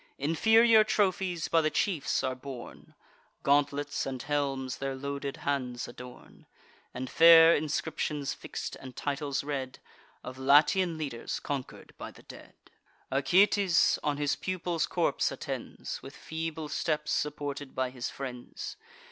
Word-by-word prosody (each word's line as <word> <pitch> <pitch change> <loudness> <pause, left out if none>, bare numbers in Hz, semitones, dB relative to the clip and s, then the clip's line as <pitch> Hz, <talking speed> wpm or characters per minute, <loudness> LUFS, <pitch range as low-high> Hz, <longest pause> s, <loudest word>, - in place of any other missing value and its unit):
Inferior 220 - +5
trophies 190 -5 0
by 165 - +3
the 155 - +1
chiefs 165 -6 0
are 130 -1 0
borne; 130 -1 -10 0.5
Gauntlets 145 0 +1
and 130 -1 -4
helms 135 -1 -2
their 135 0 -3
loaded 140 0 -4
hands 125 -4 -2
adorn; 125 +1 -12 0.4
And 130 +1 -5
fair 165 +2 +8
inscriptions 150 -1 -2
fix'd, - - -6
and 130 -2 -10
titles 140 -1 -2
read 135 -3 -4 0.5
Of 130 +1 -8
Latian 155 +6 +4
leaders 135 -7 -4
conquer'd 140 -3 -6
by - - -6
the - - -16
dead. - - -13 0.6
Acoetes 185 +6 +4
on 145 -1 -1
his 145 -1 0
pupil's 175 -3 -2
corpse - - 0
attends, - - -6
With - - -11
feeble 160 -1 -5
steps, 150 0 -1
supported 145 -2 -3
by 130 -1 -1
his 125 -1 -4
friends. 125 -3 -7
145 Hz, 130 wpm, -29 LUFS, 135-165 Hz, 0.6 s, fair